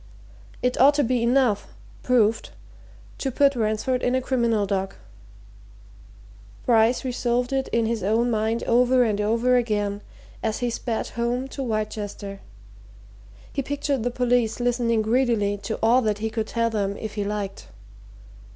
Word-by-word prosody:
It 250 0 0
ought 285 +2 +7
to 290 - +2
be 250 -1 +1
enough 235 -4 +2 0.3
proved 230 -3 +2 0.7
to 270 - -1
put 280 +2 +3
Ransford 230 +3 0
in 250 +1 +1
a 260 - +1
criminal 235 -5 +1
dock. 195 -1 -2 1.7
Bryce 235 +1 +3
resolved 245 0 -1
it 270 -1 0
in 230 -1 0
his 225 -1 -1
own 225 +5 +1
mind 220 +1 0
over 250 +1 +4
and 210 -3 0
over 230 +4 +2
again 205 -4 -1 0.4
as 220 -1 -1
he 245 -1 -1
sped 230 -1 -3
home 240 +2 -2
to 275 - -6
Wrychester 210 -3 -4 1.1
he 280 - -1
pictured 280 -1 -2
the 245 - 0
police 245 -2 +1
listening 240 -2 +1
greedily 225 -3 +1
to 215 +2 -4
all 240 +3 +5
that 215 -3 0
he 220 +1 -3
could 220 -1 -2
tell 230 0 0
them 200 -2 -1
if 220 -2 -6
he 205 - -2
liked. 200 -1 -4
230 Hz, 150 wpm, -24 LUFS, 215-250 Hz, 1.7 s, ought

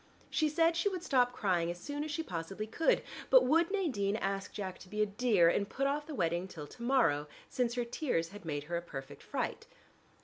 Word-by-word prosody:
She 310 -2 +2
said 330 +2 +3
she 340 +5 +2
would 365 -3 -5
stop 250 -7 +3
crying 180 -8 +1
as 175 0 -4
soon 290 +5 -4
as 310 - -5
she 320 +2 -2
possibly 185 - -4
could, 275 +9 +2 0.3
but - - +7
would 330 +2 +4
Nadine 255 - 0
ask 195 -2 -2
Jack 190 -3 -5
to 185 - -13
be 210 +1 +1
a - - +3
dear 205 -4 +3
and 200 +4 +2
put 275 - -1
off 290 +2 0
the 310 - -5
wedding 170 -2 0
till 155 -5 -8
to 235 - -14
morrow, 165 - +3 0.2
since 245 -1 0
her 245 -1 0
tears 235 - -1
had 205 +1 -11
made 145 -3 -3
her 170 +3 -4
a - - -2
perfect 140 -4 -8
fright. - - -3
215 Hz, 225 wpm, -33 LUFS, -, 0.3 s, but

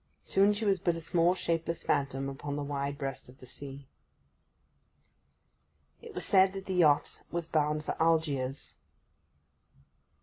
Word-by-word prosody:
Soon 200 +2 +4
she 210 +2 -3
was 195 -2 +3
but 170 0 +1
a - - -4
small, 170 +2 +2
shapeless 165 -2 -2
phantom 135 -1 0
upon 140 +1 -5
the 145 - -3
wide 140 0 -3
breast 135 -3 -5
of 130 - -15
the 130 - -13
sea. 135 +1 -9 2.1
It 460 -4 -11
was - - -1
said 190 -1 +5
that 195 -1 -6
the 190 - -3
yacht 155 -5 +3
was 170 -1 -3
bound 150 -1 +1
for - - -2
Algiers. 150 -5 0
155 Hz, 145 wpm, -30 LUFS, 140-180 Hz, 2.1 s, said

